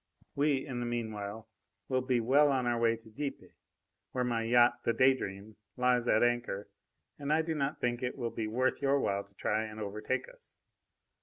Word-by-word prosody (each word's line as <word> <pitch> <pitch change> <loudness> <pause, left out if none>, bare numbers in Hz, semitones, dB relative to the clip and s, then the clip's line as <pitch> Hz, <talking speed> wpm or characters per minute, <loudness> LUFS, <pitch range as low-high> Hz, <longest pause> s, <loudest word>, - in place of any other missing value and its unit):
We, 140 -1 +1
in 125 -4 -4
the 120 - -2
meanwhile, 110 -2 -4 0.4
will 130 -1 +1
be 125 -1 +1
well 140 +5 +4
on 130 -2 +1
our 120 -1 +1
way 115 0 +3
to 115 0 -16
Dieppe, 140 +5 -5 0.6
where 125 - 0
my 120 -2 0
yacht, 120 +1 +4
the 115 - +2
Day 130 +3 +5
Dream, 100 -3 -7 0.2
lies 125 -1 +2
at 110 - +4
anchor, 120 -4 -1 0.5
and 145 0 -2
I 160 +1 +3
do 160 0 -2
not 145 -1 -2
think 120 -1 0
that 125 - -1
it 125 - -6
will 120 -3 -2
be 110 -1 -3
worth 130 +6 0
your 140 0 +3
while 100 -5 0
to 100 0 -26
try 110 +1 0
and 110 0 -8
overtake 105 +5 -3
us. - - -18
120 Hz, 205 wpm, -32 LUFS, 110-130 Hz, 0.6 s, Day